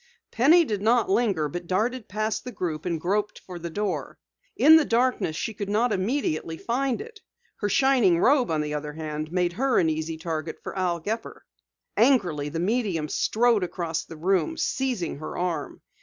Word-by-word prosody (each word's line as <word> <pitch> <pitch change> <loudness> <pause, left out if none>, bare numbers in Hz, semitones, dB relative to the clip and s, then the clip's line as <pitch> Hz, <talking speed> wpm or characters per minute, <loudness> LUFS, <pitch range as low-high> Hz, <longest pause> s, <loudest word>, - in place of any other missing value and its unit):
Penny 320 +9 +5
did 210 -6 -2
not 225 -1 +2
linger, 200 -8 +2
but 175 +4 -6
darted 220 +6 -1
past 215 +2 -2
the 250 - -6
group 165 -6 -4
and 170 -2 -1
groped 205 +5 -1
for 180 -2 -8
the 170 0 -5
door. 200 +3 -3 0.4
In 315 +2 +8
the 320 - +4
darkness 240 - +1
she 225 - -3
could 205 -1 -5
not 220 +2 +2
immediately 185 - -1
find 255 +4 -1
it. 450 -1 -11 0.4
Her 205 - -1
shining 245 -8 +4
robe, 260 +3 +3
on 155 -2 0
the 150 0 -3
other 150 0 -4
hand, 155 0 -5
made 180 -1 0
her 260 +6 +1
an 160 -2 +3
easy 160 +1 -3
target 160 -1 -4
for - - -6
Al 180 -3 0
Gepper. 215 +7 -5 0.5
Angrily 185 - +2
the 165 - -4
medium 185 -6 0
strode 230 -2 +2
across 170 -2 -3
the 165 - -11
room, 195 - 0
seizing 245 - -2
her 155 - -6
arm. 170 -5 -3
190 Hz, 180 wpm, -25 LUFS, 165-240 Hz, 0.5 s, In